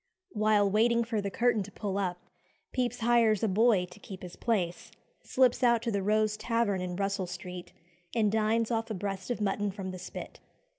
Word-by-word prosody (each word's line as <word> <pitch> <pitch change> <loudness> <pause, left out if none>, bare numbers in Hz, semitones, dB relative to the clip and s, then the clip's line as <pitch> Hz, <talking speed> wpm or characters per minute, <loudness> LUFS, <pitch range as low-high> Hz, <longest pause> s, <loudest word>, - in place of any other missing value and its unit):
While 210 -1 +3
waiting 230 +4 +3
for 225 -2 -2
the 200 - -2
curtain 230 +2 +2
to 200 +1 -7
pull 200 -1 -4
up, 180 -2 -2 0.5
Pepys 250 -2 -1
hires 230 -3 +3
a - - +3
boy 210 -1 +3
to 180 +3 -15
keep 190 -2 -10
his 180 -1 -8
place, 220 0 -1 0.3
slips 255 -1 +2
out 235 -2 +4
to 235 - -1
the 200 -2 0
Rose 215 +1 +2
Tavern 230 -4 0
in 180 -1 -3
Russell 195 -1 -1
Street, 180 0 -7 0.4
and 215 -3 +3
dines 220 +1 +1
off 225 0 -1
a 220 - -3
breast 195 +1 -4
of 245 - -1
mutton 205 0 0
from 190 -1 -5
the 185 - -7
spit. 185 - -8
210 Hz, 195 wpm, -30 LUFS, 190-230 Hz, 0.5 s, out